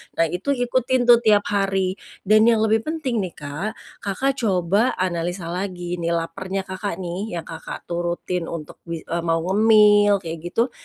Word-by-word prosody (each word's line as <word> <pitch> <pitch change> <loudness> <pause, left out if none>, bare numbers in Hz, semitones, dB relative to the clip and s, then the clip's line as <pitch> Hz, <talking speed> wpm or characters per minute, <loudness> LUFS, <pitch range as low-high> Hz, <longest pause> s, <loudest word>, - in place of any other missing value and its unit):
Nah 165 - +3
itu 235 +11 -1
ikutin 250 +1 +1
tuh 240 -1 +8
tiap 210 -3 +4
hari 195 -2 0 0.2
dan 215 +3 +5
yang 225 -2 +4
lebih 220 +3 +1
penting 300 -8 -1
nih, 185 -5 -4
Kak, 150 +8 -4 0.3
Kakak 235 +8 0
coba 200 +2 +1
analisa 175 -1 -2
lagi 180 -1 -4
nih 170 - -2
lapernya 185 +4 -3
Kakak 190 0 -4
nih 180 +3 -4
yang 170 - -4
Kakak 165 - -8
turutin 175 0 -3
untuk 155 -3 -7
mi 165 -2 -5
eee, 170 - -3
mau 165 0 +1
ngemil 205 0 +5
kayak 165 -1 -5
gitu, 225 +9 -1
190 Hz, 165 wpm, -22 LUFS, 175-215 Hz, 0.3 s, tuh